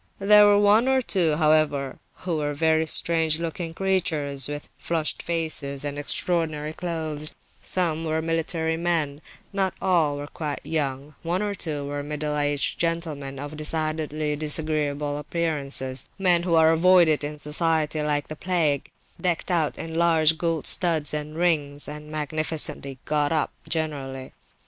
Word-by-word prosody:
There 210 Hz, +1 st, +7 dB
were 205 Hz, 0 st, +5 dB
one 205 Hz, +4 st, +4 dB
or 265 Hz, 0 st, +3 dB
two, 180 Hz, -10 st, +1 dB
however, 150 Hz, -3 st, +1 dB, 0.2 s
who 175 Hz, -3 st, -1 dB
were 145 Hz, -1 st, -2 dB
very 160 Hz, +1 st, +2 dB
strange 160 Hz, 0 st, +1 dB
looking 165 Hz, 0 st, -4 dB
creatures, 155 Hz, -8 st, 0 dB
with 145 Hz, 0 st, -6 dB
flushed 160 Hz, -2 st, -2 dB
faces 155 Hz, -4 st, -2 dB
and 145 Hz, 0 st, -3 dB
extraordinary 155 Hz, 0 st, -1 dB
clothes; 155 Hz, -3 st, -3 dB, 0.3 s
some 165 Hz, -3 st, +1 dB
were 160 Hz, 0 st, -1 dB
military 165 Hz, 0 st, -1 dB
men; 160 Hz, -4 st, -1 dB, 0.3 s
not 195 Hz, -2 st, 0 dB
all 165 Hz, -6 st, +2 dB
were 145 Hz, -, -5 dB
quite 145 Hz, -1 st, -5 dB
young; 145 Hz, -2 st, -2 dB
one 175 Hz, +4 st, -1 dB
or 205 Hz, -1 st, -2 dB
two 150 Hz, -7 st, -4 dB
were 145 Hz, 0 st, -4 dB
middle 150 Hz, +1 st, -3 dB
aged 145 Hz, -1 st, 0 dB
gentlemen 160 Hz, -5 st, -2 dB
of 145 Hz, +2 st, -6 dB
decidedly 155 Hz, -1 st, -1 dB
disagreeable 150 Hz, -1 st, 0 dB
appearance, 150 Hz, -3 st, +2 dB, 0.3 s
men 180 Hz, -3 st, +3 dB
who 170 Hz, -1 st, +1 dB
are 160 Hz, 0 st, +6 dB
avoided 165 Hz, -2 st, +4 dB
in 150 Hz, +1 st, -4 dB
society 155 Hz, 0 st, +1 dB
like 150 Hz, -1 st, 0 dB
the 155 Hz, -, -7 dB
plague, 155 Hz, -5 st, 0 dB, 0.3 s
decked 180 Hz, 0 st, -1 dB
out 165 Hz, -4 st, 0 dB
in 165 Hz, 0 st, -6 dB
large 160 Hz, -1 st, +3 dB
gold 165 Hz, -2 st, -2 dB
studs 160 Hz, -5 st, +2 dB
and 150 Hz, 0 st, -3 dB
rings, 150 Hz, -5 st, +1 dB
and 150 Hz, +1 st, -8 dB
magnificently 155 Hz, -2 st, -2 dB
"got 150 Hz, -1 st, +1 dB
up," 160 Hz, -2 st, 0 dB, 0.2 s
generally. 135 Hz, -5 st, -4 dB
155 Hz, 145 wpm, -24 LUFS, 145-170 Hz, 0.3 s, There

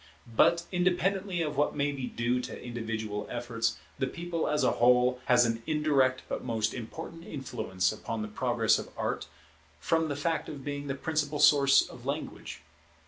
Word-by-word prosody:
But 170 Hz, +8 st, +5 dB
independently 185 Hz, 0 st, +1 dB
of 150 Hz, -2 st, -3 dB
what 145 Hz, -, +2 dB
may 145 Hz, 0 st, +1 dB
be 135 Hz, -3 st, -4 dB
due 120 Hz, +1 st, 0 dB
to -, -, -7 dB
individual 115 Hz, -3 st, -4 dB
efforts, 120 Hz, -6 st, -2 dB, 0.2 s
the 135 Hz, -, +1 dB
People 170 Hz, +3 st, -3 dB
as 150 Hz, 0 st, +1 dB
a -, -, +4 dB
whole 125 Hz, +1 st, +4 dB
has 120 Hz, -1 st, +5 dB
an 115 Hz, 0 st, -1 dB
indirect 140 Hz, -4 st, +2 dB
but -, -, -4 dB
most 110 Hz, -3 st, -1 dB
important 160 Hz, +7 st, -7 dB
influence 95 Hz, -, -2 dB
upon 110 Hz, +1 st, -4 dB
the -, -, -4 dB
Progress 115 Hz, 0 st, +2 dB
of -, -, -7 dB
Art, -, -, -2 dB, 0.5 s
from 160 Hz, -, +1 dB
the 145 Hz, -, -2 dB
fact 160 Hz, +3 st, -1 dB
of 140 Hz, -3 st, -8 dB
being 145 Hz, 0 st, -4 dB
the 135 Hz, -, -2 dB
principal 150 Hz, 0 st, -1 dB
source 140 Hz, -2 st, +6 dB
of -, -, -12 dB
language. 80 Hz, -, -5 dB
135 Hz, 170 wpm, -29 LUFS, 120-155 Hz, 0.5 s, source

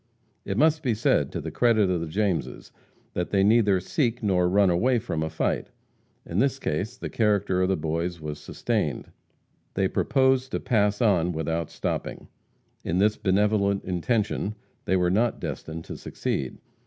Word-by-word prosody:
It 100 Hz, -, -3 dB
must 155 Hz, +3 st, +3 dB
be 125 Hz, -7 st, 0 dB
said 105 Hz, -, +1 dB
to -, -, -3 dB
the -, -, -5 dB
credit 115 Hz, -4 st, +3 dB
of 90 Hz, -2 st, 0 dB
the 85 Hz, -, -3 dB
Jameses 95 Hz, 0 st, -2 dB, 0.4 s
that 90 Hz, -, -2 dB
they 95 Hz, -1 st, +2 dB
neither 105 Hz, -2 st, +4 dB
seek 120 Hz, -, -1 dB
nor 90 Hz, -3 st, +2 dB
run 100 Hz, 0 st, +4 dB
away 120 Hz, +9 st, +2 dB
from 80 Hz, -7 st, -3 dB
a 80 Hz, -, -1 dB
fight. 80 Hz, -, -1 dB, 0.6 s
In 85 Hz, -, -2 dB
this 135 Hz, +1 st, +2 dB
case 110 Hz, -, -3 dB
the -, -, -5 dB
character 100 Hz, -4 st, +1 dB
of 95 Hz, -, +2 dB
the 95 Hz, -, +1 dB
boys 85 Hz, +2 st, -2 dB
was 75 Hz, -1 st, -6 dB
sustained. -, -, -2 dB, 0.6 s
They 95 Hz, 0 st, +2 dB
proposed 130 Hz, +3 st, +1 dB
to -, -, 0 dB
pass 105 Hz, -3 st, +1 dB
on 90 Hz, -5 st, +2 dB
without 80 Hz, 0 st, -2 dB
stopping. -, -, -4 dB, 0.5 s
In 85 Hz, -, -1 dB
this 105 Hz, +2 st, +3 dB
benevolent 100 Hz, 0 st, +1 dB
intention 105 Hz, +3 st, -1 dB, 0.3 s
they 95 Hz, -, +2 dB
were 90 Hz, -1 st, +2 dB
not 115 Hz, +4 st, +1 dB
destined 80 Hz, +1 st, -6 dB
to -, -, -7 dB
succeed. 65 Hz, -2 st, -3 dB
100 Hz, 165 wpm, -26 LUFS, 90-115 Hz, 0.6 s, neither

